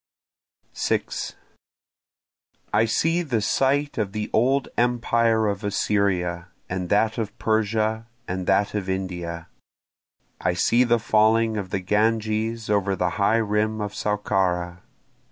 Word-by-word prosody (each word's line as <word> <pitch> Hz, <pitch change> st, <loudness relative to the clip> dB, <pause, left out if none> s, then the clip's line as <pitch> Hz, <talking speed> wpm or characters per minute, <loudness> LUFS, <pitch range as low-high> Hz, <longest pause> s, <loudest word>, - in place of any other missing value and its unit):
6 -, -, -2 dB, 1.4 s
I 115 Hz, -, +4 dB
see 165 Hz, +9 st, +1 dB
the 130 Hz, -9 st, -1 dB
site 135 Hz, +5 st, +1 dB
of 100 Hz, -2 st, -2 dB
the 105 Hz, -1 st, -4 dB
old 135 Hz, +4 st, +2 dB
empire 115 Hz, -2 st, +2 dB
of 100 Hz, 0 st, -2 dB
Assyria, 95 Hz, -4 st, 0 dB, 0.2 s
and 90 Hz, -1 st, -4 dB
that 110 Hz, +3 st, +2 dB
of 110 Hz, 0 st, -4 dB
Persia, 110 Hz, 0 st, 0 dB, 0.2 s
and 95 Hz, 0 st, -4 dB
that 100 Hz, +1 st, +2 dB
of 100 Hz, -3 st, -3 dB
India, 90 Hz, -3 st, -4 dB, 0.9 s
I 90 Hz, -, 0 dB
see 115 Hz, +8 st, +3 dB
the 120 Hz, -1 st, +3 dB
falling 110 Hz, +1 st, +3 dB
of 100 Hz, -3 st, -4 dB
the 95 Hz, -, -2 dB
Ganges 110 Hz, +2 st, 0 dB
over 100 Hz, -2 st, +1 dB
the 90 Hz, -1 st, 0 dB
high 105 Hz, +3 st, +4 dB
rim 105 Hz, +1 st, 0 dB
of 105 Hz, -1 st, -4 dB
Saukara. 90 Hz, -4 st, -1 dB
105 Hz, 125 wpm, -24 LUFS, 95-115 Hz, 1.4 s, I